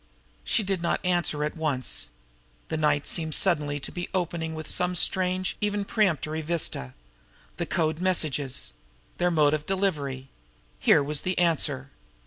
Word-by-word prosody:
She 220 - +1
did 195 -2 -1
not 170 - +1
answer 175 -4 +1
at 150 - -2
once. 150 -6 -2 0.6
The - - -1
night 150 -2 +2
seemed 160 -2 +1
suddenly 150 -6 +2
to - - -4
be 175 -1 -5
opening 165 -3 -2
some 180 +3 -1
strange, 185 +1 +1
even 205 -1 0
premonitory, 160 -7 0
vista. 155 - -1 0.6
The - - -2
code 160 -1 0
messages! 145 - 0 0.5
Their 180 - +3
mode 155 -3 +3
of 150 -1 -2
delivery! 145 -9 -1 0.5
Here 145 - +5
was 145 +1 +2
the 185 0 -2
answer! 145 -5 +1
160 Hz, 140 wpm, -27 LUFS, 150-180 Hz, 0.6 s, Here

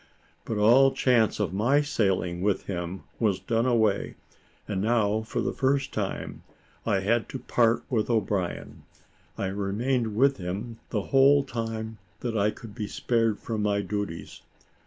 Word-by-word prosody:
But 110 - -3
all 125 +6 +6
chance 125 -5 +2
of 95 -4 -1
my 125 +9 +3
sailing 95 -11 0
with 100 -1 +1
him 90 0 -4 0.2
was 105 -5 +1
done 115 +5 0
away, 110 -5 +1 0.5
and 95 -3 -2
now, 110 -1 +2
for 110 - -3
the - - -1
first 135 0 0
time, - - -4 0.5
I 100 -4 +2
had 115 +4 +1
to - - -4
part 120 -2 +2
with 110 -4 0
O'Brien. 105 -6 -1 0.6
I - - -2
remained 105 +4 -1
with 135 +4 +3
him 100 +6 -5
the 105 -3 -1
whole 140 +1 +6
time 115 -3 -5 0.2
that 120 -3 -3
I 105 0 +3
could 110 0 -9
be 105 0 -4
spared 115 -1 0
from 110 -3 -4
my 100 -1 +1
duties. 100 -3 -5
110 Hz, 155 wpm, -27 LUFS, 100-120 Hz, 0.6 s, all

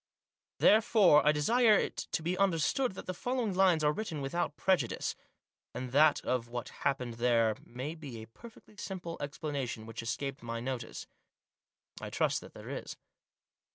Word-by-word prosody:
Therefore 210 -8 +6
I 150 - +5
desire 220 +9 +4
it - - 0 0.2
to 160 - -1
be 175 +3 0
understood 195 - +1
that - - -8
the 185 - -3
following 245 +2 -1
lines 180 -4 +4
are 150 - +4
written 165 -5 -4
without 145 +2 -2
prejudice; 180 -12 0 0.6
and 125 -1 -5
that 150 +3 +5
of 125 -2 0
what 120 0 -5
happened 125 -4 -2
there 115 -3 +3
may 130 +6 -6
be 145 -8 -8
a 110 - -8
perfectly 215 - -15
simple 180 -4 -5
explanation 140 -6 -4
which 115 +1 -6
escaped 120 +4 -4
my 115 0 -4
notice. 125 -1 -5 1.0
I - - -5
trust - - 0
that - - -13
there - - -8
is. - - -6
150 Hz, 155 wpm, -32 LUFS, 125-185 Hz, 1.0 s, Therefore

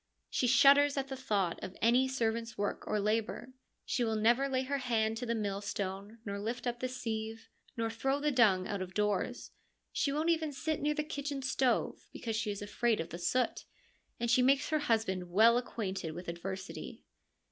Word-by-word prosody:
She 250 - +1
shudders 280 +3 +6
at 275 0 -1
the 270 - -3
thought 200 -9 -1
of 185 - -7
any 245 +4 +4
servant's 230 -3 -1
work 205 0 -2
or 210 - +1
labour. 220 +4 -1 0.3
She 245 - 0
will 225 -1 0
never 240 +6 +3
lay 260 -1 +1
her 280 +1 -1
hand 225 -3 +1
to 245 +1 -4
the 235 - 0
millstone, 200 0 -3
nor 200 -1 -3
lift 230 +5 -4
up 240 -1 -2
the 255 - -1
sieve, 225 -3 -5 0.3
nor 225 0 -1
throw 270 +5 0
the 300 +1 +1
dung 205 -8 +4
out 200 -2 -3
of 185 0 -6
doors: 210 -1 -1 0.4
she 280 - 0
won't 310 +4 +1
even 315 -3 0
sit 310 +3 -2
near 300 +1 +1
the 300 - 0
kitchen 285 -2 -4
stove, 260 -1 0
because 225 -2 -4
she 220 -1 -1
is 205 0 -4
afraid 225 +2 +1
of 165 +1 -3
the 170 - -7
soot, 250 +8 0 0.5
and 235 0 0
she 250 - +5
makes 275 +3 +3
her 310 -1 +2
husband 220 -9 0
well 220 +6 +6
acquainted 195 -9 -3
with 175 +1 -8
adversity. 190 +3 -6
230 Hz, 190 wpm, -32 LUFS, 205-265 Hz, 0.5 s, shudders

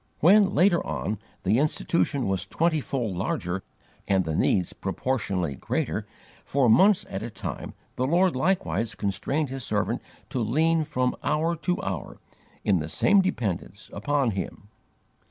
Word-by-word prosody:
When, 195 +4 +5
later 175 -1 +4
on, 105 0 -3 0.2
the 105 +6 +3
Institution 150 -2 +1
was 95 -2 -1
twentyfold 140 - 0
larger 90 0 -2 0.5
and 95 -2 +2
the 80 - -2
needs 90 +1 +2
proportionately 95 - -2
greater, 65 - -2 0.4
for 135 -2 +2
months 195 - +5
at 95 - -5
a 115 - -4
time - - -6 0.2
the 130 - +1
Lord 175 +3 +3
likewise 130 - 0
constrained 125 +10 -1
His 135 -1 -5
servant 105 +3 -1 0.3
to 130 - -1
lean 155 +8 +2
from 130 -4 0
hour 165 +3 +1
to 180 +2 -1
hour, 95 -6 -4 0.5
in 95 -4 +3
the 75 0 -4
same 200 - +4
dependence, 105 - -3
upon 135 +3 +1
Him. 100 +1 -6
125 Hz, 140 wpm, -26 LUFS, 100-160 Hz, 0.5 s, When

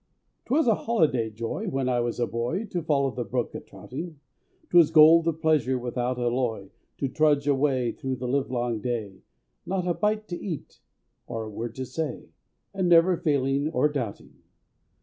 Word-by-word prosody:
'Twas 285 +5 +2
a 230 - +5
holiday 155 - +1
joy 115 +1 -4
when 135 -1 -1
I 125 -1 +1
was 120 0 -2
a 120 - +2
boy, 120 - -2
To 180 -4 -3
follow 140 -4 +1
the 125 0 -4
brook 120 0 -2
a - - -5
trouting, 155 +3 -9 0.5
'Twas 170 -3 +6
gold 160 +1 +7
of 160 -1 0
pleasure 150 -5 +2
without 125 0 -2
alloy, 120 -5 -1 0.3
To 140 - -1
trudge 145 +1 +2
away 135 -4 +2
through 130 -1 -4
the 125 0 -5
livelong 125 -3 -1
day— 105 -5 -4 0.4
Not 185 -1 -2
a 175 - +1
bite 215 +3 -1
to 175 - -5
eat, 170 -7 -6 0.5
or 115 -1 -4
a 110 - -7
word 115 +2 -5
to 130 - -4
say, 145 +2 -5 0.4
And 190 -2 0
never 170 +2 +6
a 170 - -4
failing 140 0 +1
or 150 -2 +2
doubting. 125 -8 -5
135 Hz, 175 wpm, -26 LUFS, 120-160 Hz, 0.5 s, gold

